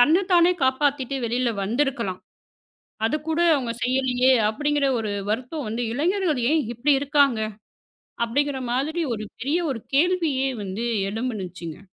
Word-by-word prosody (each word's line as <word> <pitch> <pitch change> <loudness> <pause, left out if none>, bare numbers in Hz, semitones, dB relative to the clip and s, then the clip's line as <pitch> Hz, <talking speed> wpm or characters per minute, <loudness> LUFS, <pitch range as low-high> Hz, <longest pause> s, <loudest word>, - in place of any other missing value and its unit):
தன்னத்தானே 345 +5 +5
காப்பாத்திட்டு 270 0 +1
வெளியில 240 +1 0
வந்து 230 +8 -1
இருக்கலாம். 230 -9 -3 0.9
அதைக் 300 +5 -2
கூட 320 +1 0 0.2
அவங்க 240 -4 -2
செய்யலியே 255 0 +2 0.2
அப்படிங்கிற 290 +4 0
ஒரு 215 -2 -2 0.2
வருத்தம் 255 +4 -3
வந்து. 230 +3 -2
இளைஞர்கள் 335 -2 +1
ஏன் 320 -2 +3
இப்படி 275 +5 +2
இருக்காங்க? 280 -5 +3 0.8
அப்படிங்கிற 280 +3 0
மாதிரி 310 +7 -1
ஒரு 215 -1 -5
பெரிய 290 +7 0
ஒரு 230 -4 -3
கேள்வியே 310 -4 +2
வந்து 200 +4 -4 0.3
எழுந்துச்சுங்க. 190 -8 -5
265 Hz, 125 wpm, -24 LUFS, 235-295 Hz, 0.9 s, தன்னத்தானே